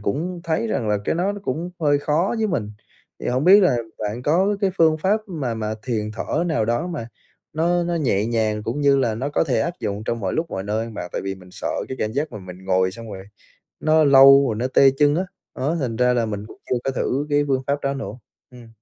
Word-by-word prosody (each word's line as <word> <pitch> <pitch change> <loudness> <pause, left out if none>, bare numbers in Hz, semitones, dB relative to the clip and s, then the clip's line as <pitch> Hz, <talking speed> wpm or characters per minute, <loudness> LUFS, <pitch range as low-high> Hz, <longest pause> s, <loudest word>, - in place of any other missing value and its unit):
cũng 165 - -3
thấy 160 -8 0
rằng 110 0 -1
là 105 -1 +2
cái - - 0
nó 185 +4 0
nó 205 - -8
cũng 165 +7 -3
hơi 145 -2 +3
khó 155 +9 0
với 220 - +1
mình, 110 - -2 0.5
thì - - -5
hổng 130 +4 0
biết 200 +3 +8
là 175 -9 +4 0.2
bạn 110 +3 -4
có 190 +8 +2
cái 195 -2 +2
phương 160 -1 +4
pháp 205 +6 +1
mà 145 - -3
mà 110 -1 -3
thiền 110 -4 -2
thở 155 +9 -2
nào 155 -9 +1
đó 120 +10 0
mà 150 -10 -5 0.4
nó 175 +3 +1
nó 170 0 -1
nhẹ 115 -10 +1
nhàng, 110 -2 0
cũng 120 +7 -3
như 140 -1 +4
là 115 -4 +1
nó 130 +6 -3
có 150 - +1
thể 130 -5 0
áp - - -1
dụng 105 -1 -3
trong 115 0 -2
mọi 95 -2 -2
lúc 165 +1 -2
mọi 95 - -3
nơi 110 +3 -2
mà 110 - -6
tại - - -3
vì 95 0 -2
mình 90 -1 -15
sợ - - -5 0.2
cái 130 - -5
cảm 110 0 -1
giác 145 +1 -2
mà 105 - -6
mình 95 -1 -11
ngồi 95 -1 +2
xong 115 +2 -10
rồi 95 0 -8 0.6
nó 155 0 +3
lâu 135 0 +8
rồi 110 - -1
nó 120 +4 -1
tê 135 +1 +5
chân 145 0 +4
á, 180 - +1 0.3
á, - - -12
đó 150 +5 0
thành 120 -6 -2
ra 125 +1 +3
là 120 -2 +1
mình 105 -1 -5
cũng - - -13
chưa - - +2
có 135 - 0
thử 135 +2 -1
cái 145 0 +3
phương 130 -1 +1
pháp 140 +1 0
đó 140 0 -1
nữa, 135 -8 -5 0.4
ừm. 120 -2 -13
130 Hz, 260 wpm, -22 LUFS, 110-160 Hz, 0.6 s, biết